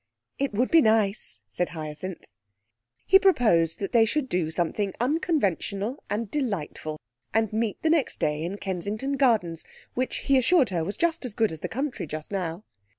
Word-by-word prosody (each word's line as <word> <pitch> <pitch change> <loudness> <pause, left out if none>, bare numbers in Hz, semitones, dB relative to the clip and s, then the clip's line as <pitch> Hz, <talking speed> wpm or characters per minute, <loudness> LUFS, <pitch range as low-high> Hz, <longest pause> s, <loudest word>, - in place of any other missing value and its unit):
'It 275 -1 0
would 235 +5 0
be 330 - +7
nice,' 215 - +1
said 110 - -2
Hyacinth. 155 +4 -6 0.8
He 385 - +7
proposed 215 - +3
that 195 - -4
they 230 -2 +6
should 260 +5 0
do 175 -3 0
something 180 +4 -1
unconventional 245 - 0
and 210 +1 -2
delightful, 195 - -3 0.4
and 220 -2 +2
meet 220 -1 -1
the 320 - +3
next 320 -5 +1
day 150 0 0
in 175 +5 -3
Kensington 205 +8 -3
Gardens, 215 - +2 0.3
which 255 +1 -2
he 275 -2 +5
assured 270 0 +4
her 170 -4 -1
was 200 +5 -4
just 335 -2 0
as 240 -5 -5
good 220 -5 +2
as 160 - -7
the - - -4
country 265 - -3
just 155 +3 -6
now. 180 -1 -3
210 Hz, 170 wpm, -26 LUFS, 175-260 Hz, 0.8 s, be